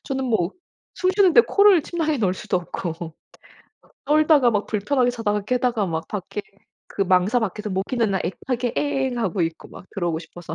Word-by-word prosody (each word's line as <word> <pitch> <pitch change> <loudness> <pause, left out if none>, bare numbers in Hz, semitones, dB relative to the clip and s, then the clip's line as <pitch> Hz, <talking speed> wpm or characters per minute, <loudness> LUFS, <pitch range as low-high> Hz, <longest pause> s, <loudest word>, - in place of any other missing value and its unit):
저는 265 -1 -3
뭐 220 -8 0 0.4
숨 370 - +1
쉬는데 390 0 +6
코를 400 -5 +5
침낭에 310 -2 -2
넣을 190 -5 +1
수도 185 - -1
없고 170 -2 -6 0.9
떨다가 300 -3 +4
막 205 -2 0
불편하게 245 +4 +1
자다가 210 -4 -1
깨다가 245 0 0
막 165 -3 -4
밖에 205 0 -5 0.5
그 200 - -1
망사 190 +5 +3
밖에서 210 -1 -3
모기는 210 +4 -1
나 190 - +1
애타게 245 +7 -3
앵 265 -4 -1
하고 190 -5 -1
있고 165 0 -4
막 - - -12
들어오고 175 -4 -1
싶어서. 170 -1 -9
220 Hz, 345 characters per minute, -23 LUFS, 185-265 Hz, 0.9 s, 쉬는데